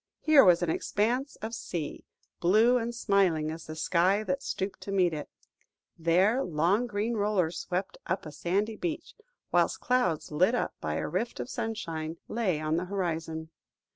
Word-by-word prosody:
Here 310 -3 +6
was 175 -2 +5
an 165 - +1
expanse 245 - 0
of 225 +1 -4
sea, 170 -9 -5 0.3
blue 220 +8 +4
and 235 +1 -3
smiling 185 -8 +2
as 160 +1 -8
the 155 - -6
sky 185 +6 +2
that 185 -3 -2
stooped 190 +1 -4
to 200 - -6
meet 180 -4 +3
it; 150 -2 -5 0.7
there, 185 +10 +3
long 180 +9 +1
green 210 +2 -1
rollers 200 -6 0
swept 185 +2 -3
up 185 0 -2
a 155 - -7
sandy 200 +8 -1
beach, 335 -1 -4 0.4
whilst - - +2
clouds 215 -14 0
lit 185 +10 +3
up - - -1
by - - -2
a - - -2
rift - - -2
of - - -5
sunshine, 165 -7 -4
lay 205 -9 0
on 155 +1 0
the 180 - -1
horizon. 165 -4 -3
185 Hz, 170 wpm, -29 LUFS, 165-220 Hz, 0.7 s, Here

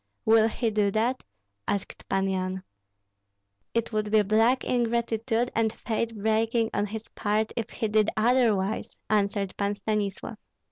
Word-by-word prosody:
"Will 220 0 +5
he 225 0 -1
do 210 -1 +2
that?" 230 +5 0 0.5
asked 200 - -4
Pan 195 0 +1
Yan. 185 0 -2 1.1
"It 230 0 0
would 215 -1 0
be 215 0 +4
black 225 +5 +3
ingratitude 235 0 0
and 225 -1 +1
faith 225 0 -3
breaking 220 +2 +1
on 205 +1 0
his 220 +2 -6
part 215 +1 -1
if 230 -2 -3
he 225 - -2
did 215 0 +3
otherwise," 220 -3 +1
answered 200 -2 +1
Pan 200 0 0
Stanislav. 210 +1 -3
220 Hz, 140 wpm, -27 LUFS, 205-230 Hz, 1.1 s, Will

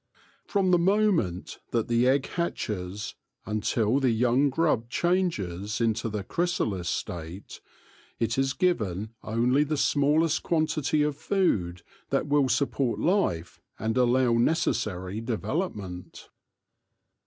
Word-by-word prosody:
From 195 -3 +1
the 175 - +5
moment 185 - +1
that 115 -2 0
the 120 +1 +2
egg 135 +1 +3
hatches 105 - -3 0.3
until 110 +3 +1
the 135 -2 +2
young 125 +4 +3
grub 135 -5 0
changes 105 - -1
into 115 0 0
the 105 -2 -4
chrysalis 110 - -1
state, 85 +3 -5 0.6
it 115 -1 0
is 135 0 +1
given 110 - -1
only 120 +6 +2
the 150 0 -2
smallest 150 +3 +2
quantity 155 -2 +1
of 150 -1 0
food 95 - 0 0.3
that - - +1
will 145 -2 +2
support 130 0 0
life 160 - 0 0.2
and 110 +1 -2
allow 125 0 +3
necessar}' 110 - 0
development. 105 - -4
120 Hz, 115 wpm, -27 LUFS, 105-155 Hz, 0.6 s, the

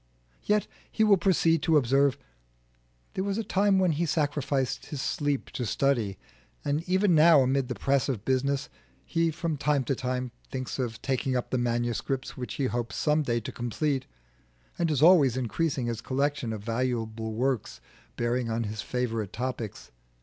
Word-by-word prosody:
Yet, 210 0 +1 0.3
he 220 - +2
will 210 -2 +6
proceed 165 -3 +3
to 160 -2 +4
observe, 135 +1 +3 1.0
there 190 - -2
was 200 0 -1
a 225 - -1
time 200 -1 +2
when 185 -2 +3
he 165 +3 0
sacrificed 145 -4 -1
his 145 - -5
sleep 145 0 -1
to 125 - -3
study, 120 -5 0 0.5
and 145 +2 +1
even 190 0 +3
now 160 -2 +7
amid 130 0 +1
the 125 - -3
press 135 0 +1
of 115 -5 -3
business 135 +2 0 0.4
he 165 -1 +1
from 160 -1 -2
time 145 -1 +1
to 135 - 0
time 125 -1 -3 0.2
thinks 130 +1 -4
of 120 -2 -2
taking 130 -1 0
up 125 - -4
the 130 - +1
manuscripts 120 +2 -1
which 125 -1 -5
he 140 - 0
hopes 120 -2 -2
some 150 0 +2
day 120 -5 0
to - - -6
complete, 130 +3 -2 0.7
and 170 -1 +2
is 150 -2 +1
always 150 -8 +6
increasing 130 +2 -1
his 115 -1 -3
collection 140 -2 -1
of 105 -2 -5
valuable 115 -2 -2
works 130 -1 -1 0.4
bearing 120 0 -1
on 115 +1 -1
his 105 0 -4
favourite 115 -5 -2
topics. 120 -3 -5
135 Hz, 170 wpm, -28 LUFS, 120-150 Hz, 1.0 s, now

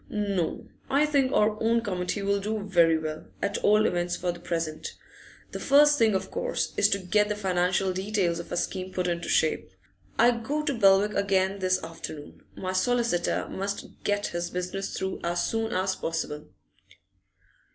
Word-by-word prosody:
'No, 200 -5 -2 0.2
I 285 +3 +3
think 280 -3 +2
our 215 -2 +2
own 230 +1 +3
committee 195 -1 -2
will 200 0 +1
do 210 +1 -3
very 170 -5 +4
well, 155 0 -5
at 200 +1 -1
all 210 +1 +4
events 175 0 0
for 180 0 -1
the 170 - -10
present. 165 -3 -4 0.6
The - - -5
first 290 +1 +5
thing, 220 -3 +4
of 190 - -3
course, - - -2
is - - +4
to 200 - +2
get 210 +3 +1
the 210 - -1
financial 185 -1 +1
details 190 -3 0
of 170 - -9
our - - -1
scheme 185 +1 -3
put 180 -1 -2
into 170 -1 -2
shape. 155 - +1 0.5
I 240 +2 +6
go 260 +6 -2
to 290 - 0
Belwick 205 -2 +4
again 195 0 +1
this 185 -1 +1
afternoon; 160 -2 -8
my 185 0 -4
solicitor 235 -3 +1
must 200 +1 -5
get 205 0 0
his 175 0 -2
business 180 +2 -4
through 190 0 -3
as 175 0 0
soon 225 0 -1
as 190 -2 0
possible. 155 -2 -4
195 Hz, 170 wpm, -27 LUFS, 175-215 Hz, 0.6 s, I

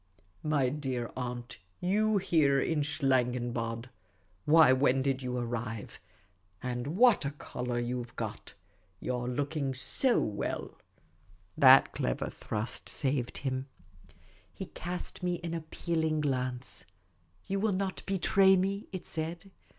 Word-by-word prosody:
" 90 +1 -36
My 130 -2 +3
dear 130 -4 -3
aunt, 120 -3 -5 0.2
jyou 210 +3 +2
here 150 -7 +3
in 155 +1 +1
Schlangenbad! 125 -4 0 0.6
Why, 155 -3 +7
when 130 0 +3
did 135 -1 0
you 125 -1 -3
arrive? 115 -2 -4 0.6
And 125 0 -3
what 240 -5 +6
a 140 - 0
colour 125 -4 -5
you 120 +1 -2
've 120 - -15
got! 110 -2 -6 0.4
You 125 - -2
're 120 0 -3
looking 140 +1 -2
so 245 - +3
well! 105 -1 -3 0.4
" - - -32
That - - +9
clever - - -2
thrust 110 +2 -4
saved 135 -3 0
him. 130 0 -1 0.8
He - - -7
cast 175 +3 -6
me 180 -1 -1
an 170 -1 -3
appealing 160 -1 -1
glance. 130 -3 -2 0.3
" 85 +2 -38
You 195 +1 -1
will 215 +2 +2
not 190 0 -2
betray 195 0 +5
me?" 195 +2 -1
it 185 -2 -6
said. 165 +4 -4
135 Hz, 135 wpm, -31 LUFS, 125-170 Hz, 0.8 s, That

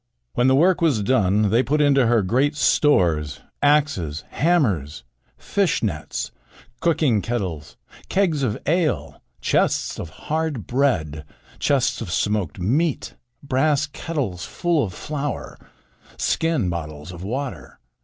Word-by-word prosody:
When 120 +1 +2
the 130 - +5
work 175 +6 +3
was 140 -11 +2
done, 105 -3 +2
they 115 +3 +4
put 150 +3 0
into 140 -4 +4
her 115 -3 +3
great 130 +10 +1
stores, 85 - +2 0.2
axes, 145 - +1
hammers, 105 - +1 0.3
fish - - 0
nets, - - -3 0.5
cooking 155 -10 +2
kettles, 95 -11 -4 0.3
kegs 180 -7 +1
of 115 -6 0
ale, 165 +1 0 0.2
chests - - +1
of 80 - -5
hard 155 - -3
bread, 80 - 0 0.4
chests 135 -4 +1
of 100 -6 -5
smoked 105 -3 -1
meat, 140 - 0 0.3
brass 140 +2 +2
kettles 140 - -4
full 170 - 0
of 95 - -3
flour, 145 -1 -4 0.6
skin 165 - 0
bottles 75 -2 -5
of 90 -1 -9
water. 130 +6 -5
130 Hz, 125 wpm, -22 LUFS, 95-150 Hz, 0.6 s, the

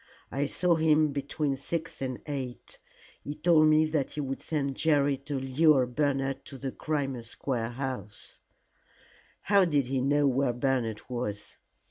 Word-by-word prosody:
I 140 +3 0
saw 175 +2 +2
him 155 -1 +3
between 140 0 -2
six 160 +4 -4
and 130 -2 -4
eight. 135 -4 -6 0.4
He 145 - -5
told 160 -2 +4
me 155 0 +5
that 155 -3 -1
he 150 - -4
would 135 -1 -4
send 140 -4 -2
Jerry 145 -2 +2
to 140 0 -4
lure 135 +1 +4
Bernard 135 +1 -1
to 135 - -8
the 135 0 -4
Crimea 135 -5 -2
Square 115 0 -3
house 130 -5 -6 0.5
" - - -30
"How 200 -1 +7
did 150 -6 +2
he 130 +1 -1
know 145 +2 +2
where 135 -1 +2
Bernard 120 -4 -1
was?" 120 -5 -4
140 Hz, 155 wpm, -29 LUFS, 130-150 Hz, 0.5 s, How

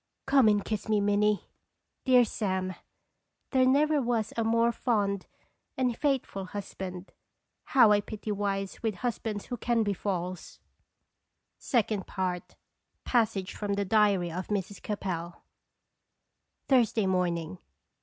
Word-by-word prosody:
Come 270 -4 +5
and 205 -1 +3
kiss 215 0 -3
me, 215 -1 +3
Minnie." 205 +1 +2 0.6
Dear 250 -2 +6
Sam! 190 -4 -2 0.8
There 260 -2 +4
never 295 +2 +3
was 230 -3 -1
a 230 - 0
more 230 +1 +3
fond 205 -5 0 0.5
and 250 -2 +1
faithful 260 -9 -1
husband. 185 -2 -7 0.5
How 240 -5 +6
I 205 0 +4
pity 215 +1 -6
wives 195 -1 -2
with 220 -3 -1
husbands 220 -2 -3
who 245 - -5
can 235 0 +1
be 205 -1 0
false! 185 -2 -4 1.1
II. 220 -5 +2 1.0
PASSAGE 210 -6 +1
FROM 205 -1 -2
THE 200 0 -1
DIARY 200 -4 +3
OF 185 +3 -4
MRS. 200 -1 -3
CAPEL. 175 -5 -4 1.2
Thursday 230 -5 +3
morning. 175 -2 -1
210 Hz, 120 wpm, -29 LUFS, 190-235 Hz, 1.2 s, Dear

